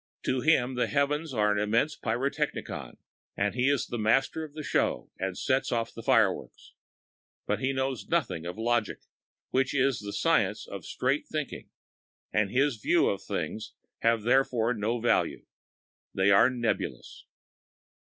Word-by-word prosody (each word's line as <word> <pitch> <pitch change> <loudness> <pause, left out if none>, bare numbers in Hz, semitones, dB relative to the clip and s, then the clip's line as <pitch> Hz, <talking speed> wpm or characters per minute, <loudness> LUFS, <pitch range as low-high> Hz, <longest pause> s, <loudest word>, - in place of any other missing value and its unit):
To 130 - 0
him 130 -4 +3
the 125 - 0
heavens 150 +2 0
are 105 -4 +2
an 105 - +1
immense 115 +9 +1
pyrotechnicon 140 +4 -3 0.4
and - - +1
he 125 +3 +2
is 140 -1 +1
the 120 - -5
master 115 +8 +2
of 150 -1 -10
the 155 - -5
show - - 0
and 95 -1 -3
sets 130 +1 0
off 115 -1 -1
the 115 - -8
fireworks. - - +1 0.7
But - - -1
he 130 - 0
knows 130 -2 -2
nothing 85 +1 -1
of 90 - -6
logic, 115 -1 0 0.5
which 135 +2 +1
is 135 -1 +2
the 105 -1 -6
science 105 - +1
of 100 -4 -8
straight 135 +4 -1
thinking, 150 -3 -5 0.6
and 105 -2 +2
his 130 +2 +1
views 105 - +3
of - - -2
things 110 - -4 0.3
have 115 -2 +2
therefore 125 -1 +2
no 115 +2 -1
value; 120 - +1 0.7
they 95 +1 +3
are 100 +5 +6
nebulous. 120 -3 -3
120 Hz, 155 wpm, -28 LUFS, 110-135 Hz, 0.7 s, are